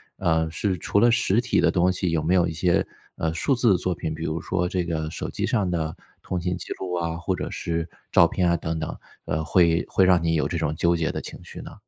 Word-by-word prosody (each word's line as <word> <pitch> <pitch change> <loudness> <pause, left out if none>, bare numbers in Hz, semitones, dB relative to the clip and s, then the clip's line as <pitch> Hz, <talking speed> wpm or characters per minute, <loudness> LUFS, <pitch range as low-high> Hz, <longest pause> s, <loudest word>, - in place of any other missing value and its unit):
呃 80 -3 +1
是 95 +3 -1
除 90 - -1
了 120 - +6
实 115 -1 +2
体 125 - +1
的 - - +4
东 90 0 +3
西， 90 -1 -1
有 80 -2 0
没 85 +4 +2
有 90 -2 +3
一 80 - -4
些， 85 +2 +2 0.3
呃， 80 0 -1
数 85 - +1
字 120 -3 +3
的 95 - +4
作 90 +1 -1
品？ 80 -1 -4
比 80 - -6
如 80 0 -2
说 90 -1 -1
这 90 -1 -1
个 80 -2 -2
手 - - -5
机 - - -2
上 105 -6 0
的 80 -2 -2 0.3
通 90 - -3
信 90 +1 -2
记 - - -8
录 90 -1 -4
啊， 85 -1 -2
或 90 +2 -1
者 - - -4
是 85 0 -2 0.2
照 85 - +6
片 90 +1 +1
啊 85 - +3
等 80 0 -3
等， 80 - -4 0.3
呃， 80 +1 -1
会 85 0 +3
会 95 - +3
让 90 -2 +5
你 80 0 +1
有 75 - +1
这 85 - -3
种 75 -2 -1
纠 85 +2 +2
结 80 -1 0
的 - - -4
情 - - -9
绪 - - -10
呢？ - - -10
85 Hz, 285 characters per minute, -24 LUFS, 80-90 Hz, 0.3 s, 了